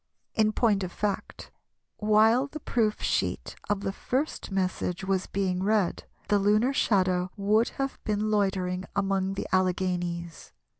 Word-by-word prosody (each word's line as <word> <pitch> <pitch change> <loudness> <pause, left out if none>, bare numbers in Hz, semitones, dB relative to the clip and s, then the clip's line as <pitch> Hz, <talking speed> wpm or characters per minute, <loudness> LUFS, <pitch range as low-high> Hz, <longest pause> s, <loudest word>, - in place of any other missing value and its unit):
In 215 -1 +3
point 215 -3 +2
of 180 - -4
fact, 205 +1 -4 0.5
while 220 +5 +4
the 305 +2 -8
proof 225 -6 0
sheet - - -1
of 205 -1 0
the 195 - -2
first 270 +9 -2
message 185 -2 -2
was 190 -1 0
being 185 -2 -1
read, 205 -2 +1 0.2
the 205 - +3
lunar 215 +6 +3
shadow 185 -7 +2
would 210 +3 +2
have 270 0 -3
been 215 0 -1
loitering 190 -3 0
among 195 -1 0
the - - -3
Alleghanies. 175 -2 -1
200 Hz, 140 wpm, -27 LUFS, 185-215 Hz, 0.5 s, while